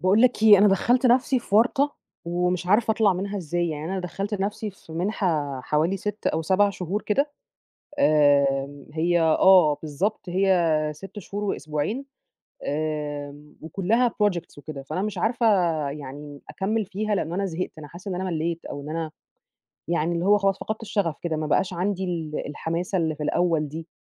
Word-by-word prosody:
باقول 190 +6 +4
لك 250 -3 +3
إيه، 210 -3 +9
أنا 205 - +6
دخَّلت 245 +7 +3
نفسي 255 +2 +3
في 205 -4 -6
ورطة 270 +6 +3 0.3
ومش 175 +1 -1
عارفة 215 +4 +3
أطلع 220 -2 +3
منها 195 +3 -3
إزاي، 175 0 -1
يعني 150 -1 -4
أنا 195 - -1
دخَّلت 195 +4 -4
نفسي 210 +2 -2
في 180 -4 -15
مِنحة 165 -6 -1
حوالي 155 +8 0
6 210 +2 -5
أو 160 - +1
7 195 +5 +3
شهور 190 +2 -3
كده 280 +8 +1 0.7
آآ، 140 - +3
هي 170 +2 +2
آه 165 -1 +5
بالضبط، 180 +7 -2
هي 175 -5 +2
6 195 +6 -10
شهور 205 +2 -5
وأسبوعين، 175 - -2 0.6
آمم، 150 -1 -4
وكُلَّها 200 +9 +1
projects 200 -8 -1
وكده، 145 -1 -8
فأنا 180 +7 -3
مش 215 0 -3
عارفة 235 +1 0 0.4
يعني 145 0 -8
أكمِّل 215 +3 -1
فيها 205 +2 -2
لأن 165 -3 -2
انا 195 +2 0
زهقت، 180 -1 -3
أنا 150 - -9
حاسّة 175 +6 -9
إن 185 - -2
أنا 185 - -3
ملِّيت 170 -2 -2
أو 145 - -6
إن 150 - -8
أنا 160 0 -3 0.8
يعني، 170 0 0
اللي 170 +1 -1
هو 205 +2 +5
خلاص 195 -1 +1
فقدْت 215 +1 -4
الشغف 200 -7 -1
كده، 165 -2 -1
ما 155 0 -2
بقاش 185 +5 +1
عندي 190 +2 -1
ال 165 -4 -3
الحماسة 170 +5 -2
اللي 160 -2 0
في 150 - -7
الأوّل 160 -1 +1
دي، 160 +3 -7
180 Hz, 175 wpm, -25 LUFS, 155-205 Hz, 0.8 s, إيه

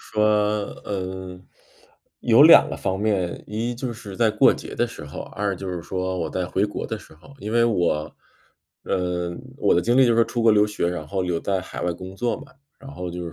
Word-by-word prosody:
说， 105 0 0 0.6
嗯， 95 -2 -5 0.7
有 - - +6
两 - - +9
个 - - -5
方 95 -1 -2
面： 100 -5 -1
一 115 +3 -2
就 120 0 -4
是 105 -4 -9
在 115 -2 +3
过 105 - +5
节 - - -8
的 - - +1
时 - - -10
候， 70 - -8
二 100 -1 -3
就 95 +1 -6
是 90 -2 -3
说 95 +2 -3
我 - - -2
在 90 - -2
回 95 +2 0
国 105 - -4
的 - - -4
时 - - -16
候。 85 - -17
因 105 +1 -5
为 115 0 +4
我 90 -9 0 0.7
嗯， 90 -1 -2 0.2
我 - - +3
的 85 - +3
经 120 +6 +1
历 135 - +7
就 120 - +3
是 - - +1
说 115 - +5
出 120 - -3
国 115 - +6
留 105 -1 +5
学， 105 -4 -1
然 90 -3 -4
后 95 +3 -2
留 90 -2 -1
在 95 +2 -1
海 90 - -7
外 90 - 0
工 95 +3 -9
作 120 +1 -1
嘛。 - - -14 0.3
然 135 - -11
后 90 -8 -5
就 90 0 -5
是 85 - -7
95 Hz, 250 characters per minute, -23 LUFS, 90-110 Hz, 0.7 s, 两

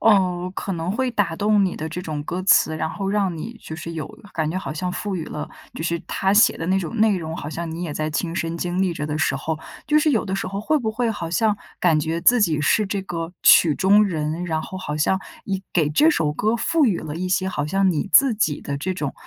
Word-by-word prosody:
呃， 185 -4 +3
可 195 - -3
能 165 +2 -3
会 255 +2 0
打 200 -7 0
动 205 +1 +3
你 185 - -1
的 160 - -5
这 160 +3 -5
种 155 -5 -4
歌 175 +4 -4
词， 160 -4 +4
然 160 - -1
后 195 +4 -4
让 195 -4 0
你 230 +9 -6
就 160 - -8
是 165 +1 -6
有 155 -3 -4 0.3
感 160 -2 -1
觉 175 - -3
好 190 - -4
像 180 +3 -3
赋 195 +1 -3
予 160 - -4
了 150 - -6 0.3
就 - - -5
是 170 0 -1
他 195 0 0
写 210 - +5
的 165 - -4
那 190 +1 +2
种 195 +6 -5
内 215 -2 +3
容， 160 0 -5
好 145 - -6
像 165 +1 -4
你 165 +2 -5
也 160 -4 -3
在 155 +1 -2
亲 165 +2 -2
身 170 -1 -2
经 175 +2 -2
历 185 -2 +1
着 145 - -4
的 155 0 -3
时 160 - +1
候， 155 +3 -3 0.3
就 305 0 +5
是 305 0 +3
有 225 - +1
的 190 -1 -3
时 - - -3
候 195 +2 -4
会 305 +7 +1
不 220 -4 -2
会 235 0 0
好 170 -6 -4
像 210 +4 +1 0.2
感 165 -4 +4
觉 160 +2 -2
自 245 +4 +5
己 160 -7 +2
是 205 +8 +2
这 200 0 -2
个 170 -2 -5
曲 155 -4 +7
中 205 +5 +5
人， 160 -1 -2
然 160 -2 -1
后 185 - -7
好 150 -5 -4
像 190 +5 +2 0.3
以 195 -1 -2
给 155 -4 +2
这 300 - +4
首 150 - 0
歌 215 +9 0
赋 315 +3 +2
予 195 -6 +1
了 155 0 -6
一 185 +1 -3
些 185 +1 +1
好 150 -5 -2
像 195 +3 +2
你 175 +4 -2
自 275 -3 +6
己 155 -8 0
的 140 - -4
这 185 +5 -2
种 145 -5 -3
180 Hz, 285 characters per minute, -22 LUFS, 160-200 Hz, 0.3 s, 曲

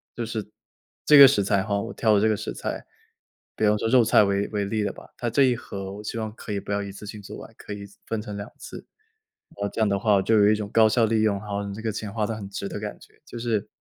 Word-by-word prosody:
就 120 - -3
是 110 -2 -4 0.6
这 150 - +7
个 140 -1 +12
食 115 -7 +2
材 100 -1 +1
吼， 100 0 -1
我 115 - -6
挑 110 -2 +2
的 100 - +3
这 110 - +3
个 110 - +1
食 - - -5
材， - - -5 0.7
比 110 - +1
方 105 - +3
说 115 - -1
肉 125 -1 +6
菜 105 - +5
为 100 0 0
为 105 -2 -1
例 105 +2 -1
的 100 - -2
吧， - - -14
它 120 - -2
这 125 +5 +3
一 130 -2 +4
盒 95 -4 -7
我 105 - -8
希 115 - -5
望 110 -1 -3
可 110 -2 -7
以 100 - -2
不 - - -7
要 100 0 0
一 100 - -6
次 100 - -10
性 105 0 -8
做 - - -9
完， - - -11
可 - - -8
以 100 0 -7 0.2
分 115 -1 -3
成 105 -2 -7
2 100 0 -6
次。 - - -10 0.7
然 100 0 -1
后 - - -5
这 110 - -2
样 110 - +3
的 100 -1 0
话 105 -1 +3
我 95 - +3
就 110 +3 +2
有 105 0 +6
一 - - +3
种 105 -1 -5
高 110 -1 +5
效 115 +1 +3
利 110 0 +1
用， 105 -2 +2
然 100 - -12
后 100 0 -2
你 100 - -5
这 110 - -7
个 110 - -1
钱 110 -1 -5
花 110 -2 0
得 115 - -3
很 100 -2 -7
值 100 0 -5
的 - - -5
感 105 0 -6
觉， - - -20
就 120 - -9
是 115 -4 -1
105 Hz, 325 characters per minute, -25 LUFS, 100-110 Hz, 0.7 s, 个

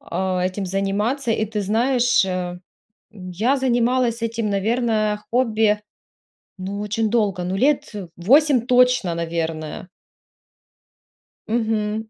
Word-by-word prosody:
а, 185 -1 -2
этим 185 +2 -2
заниматься. 205 +7 -1
И 220 - 0
ты 215 0 -4
знаешь, 240 +2 +2
э, - - -4 0.8
м, 185 -4 -9
я 225 +10 +1
занималась 245 -2 +1
этим, 230 -1 -2
наверно, 215 0 0
хобби, 220 -4 +2 0.8
ну, 195 +2 -5
очень 215 +2 -1
долго, 205 -6 0
ну, 185 +2 -2
лет, 275 +6 +1
э, 195 -4 -6
8 265 - +4
точно, 250 -8 +3
наверное. 165 0 -4 1.6
Мгм. 220 -1 -1
215 Hz, 115 wpm, -21 LUFS, 195-240 Hz, 1.6 s, 8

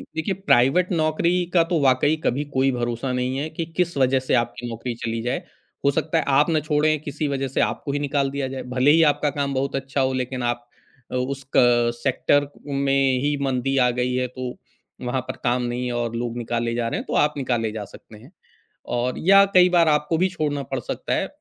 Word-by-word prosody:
देखिए 160 +5 -1
प्राइवेट 180 -1 +3
नौकरी 170 +2 +1
का 170 -2 +5
तो 165 -1 0
वाक़ई 135 +3 +3
कभी 140 +4 0
कोई 135 +1 +2
भरोसा 120 +1 -2
नहीं 125 +1 -1
है 150 +3 -3
कि 165 +1 -4
किस 175 -3 +1
वजह 130 0 +3
से 130 - -2
आपकी 120 0 -1
नौकरी 115 +1 -5
चली 115 0 -2
जाए। 125 +2 -2 0.4
हो 140 - +5
सकता 160 +3 -1
है 160 - +2
आप 140 +4 +3
ना 155 -1 +2
छोड़ें 150 0 +1
किसी 150 0 -3
वजह 135 -1 -2
से 130 - -1
आपको 140 - -1
ही 145 - -1
निकाल 140 -1 0
दिया 140 -1 -2
जाए, 130 0 -6
भले 125 +3 +2
ही 165 +2 +5
आपका 150 0 -1
काम 140 0 -2
बहुत 135 +1 -1
अच्छा 135 0 -2
हो 130 0 +1
लेक़िन 130 -1 -3
आप 120 0 -2 0.4
अ, - - -3
उस 135 +1 -3
क 120 -1 +4
सेक्टर 145 +2 +2 0.2
में 135 -2 +1
ही 145 0 +1
मंदी 135 0 0
आ 125 -1 +4
गई 125 0 0
है 125 0 0
तो 125 0 -6 0.5
वहाँ 125 +1 -1
पर - - -4
काम 125 +1 +1
नहीं 120 +1 -3
है 125 - -2
और 120 -1 -2
लोग 120 0 -3
निकाले 115 0 -2
जा 120 -1 -1
रहे - - -2
हैं - - -7
तो - - -4
आप 150 - -14
निकाले 120 -5 -1
जा 105 -2 -5
सकते 105 +2 -15
हैं। 125 +10 -16 0.6
और 125 +1 -1
या 195 +3 +6
कई 180 0 +6
बार 170 -2 +4
आपको 150 +2 +2
भी 185 - +3
छोड़ना 150 -5 -2
पड़ 135 0 -4
सकता - - -4
है। - - 0
135 Hz, 225 wpm, -23 LUFS, 125-150 Hz, 0.6 s, या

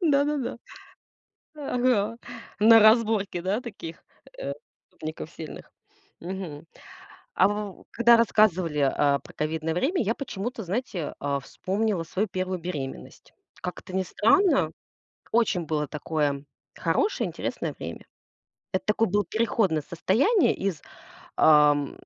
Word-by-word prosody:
Да-да-да. 285 -6 +1 1.0
Ага. 245 -6 0 0.4
На 225 +1 +8
разборки, 215 -4 +4
да, 195 +6 0
таких, 195 -9 -8 0.4
э, - - -3 0.4
преступников 155 0 -7
сильных. 160 -2 -9 0.5
Мгм. 170 -4 -6 0.7
А - - +5
в 205 -1 -5
когда 235 0 +6
рассказывали, 185 -8 +3
а, 140 +1 +3
про - - -15
ковидное 160 +1 -2
время, 280 - +1
я 225 +1 0
почему-то, 240 -3 -5
знаете, 185 - -3
а, 140 -1 -1
вспомнила 195 +5 -2
свою 195 +6 -2
1 185 0 -2
беременность. 150 -6 -7 0.3
Как 180 - -5
это 185 - -11
ни 190 - +2
странно, 345 - +3 0.6
очень 220 -6 +2
было 150 -1 -1
такое 145 -2 -1 0.3
хорошее, 425 - 0
интересное - - -4
время. - - -7 0.7
Это 190 - -1
такое 215 +2 +2
было 205 +2 +1
переходное 210 -6 +1
состояние 235 - +2
из, 190 -6 -3 0.6
ам, 150 -2 +5
190 Hz, 115 wpm, -26 LUFS, 160-230 Hz, 1.0 s, На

